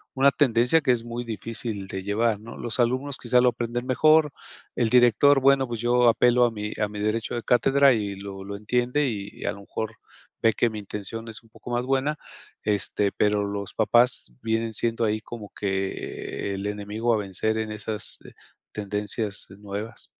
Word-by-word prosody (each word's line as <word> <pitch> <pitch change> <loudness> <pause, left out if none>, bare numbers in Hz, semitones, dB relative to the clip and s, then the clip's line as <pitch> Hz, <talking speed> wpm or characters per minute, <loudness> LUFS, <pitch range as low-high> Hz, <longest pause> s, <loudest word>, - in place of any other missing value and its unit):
una 135 +1 +5
tendencia 125 +3 +3
que 140 - +2
es 120 -2 0
muy 120 +1 -5
difícil 110 -2 -5
de 95 0 -5
llevar, 105 +2 +1
¿no? 115 +2 -10
Los 120 +1 -4
alumnos 130 +3 +1
quizá 125 0 +3
lo 125 - +5
aprenden 120 +1 -3
mejor. 155 +3 +4 0.4
El 120 -2 +1
director, 125 +4 +5
bueno, 135 0 +4
pues, 120 -2 -5
yo 120 0 +3
apelo 125 +1 +4
a 120 - +1
mi 105 -1 -5
a 105 - +1
mi 105 0 -8
derecho 110 +2 -1
de 120 - -2
cátedra 135 +2 +4
y 105 -3 -2
lo 95 0 -8
lo 100 +1 -6
entiende 125 +7 0
y, 100 -4 -5
a - - 0
lo 100 - -11
mejor, 110 +2 -5 0.5
ve 115 - +5
que 120 - +2
mi 110 - -7
intención 105 +3 -6
es 110 - -8
un 115 - -23
poco 120 - -10
más 120 +1 0
buena, 135 +3 0 0.5
este, 105 -1 0
pero 105 0 +1
los 100 -1 -5
papás 120 - +3
vienen 115 0 -1
siendo 115 +2 0
ahí 110 0 0
como 110 -3 -9
que 95 0 -3
el 100 +1 -4
enemigo 105 +3 -2
a - - +1
vencer 105 +2 -1
en 110 -1 -2
esas 105 0 -3 0.5
tendencias 105 0 -3
nuevas. 105 +2 -6
115 Hz, 185 wpm, -25 LUFS, 105-120 Hz, 0.5 s, una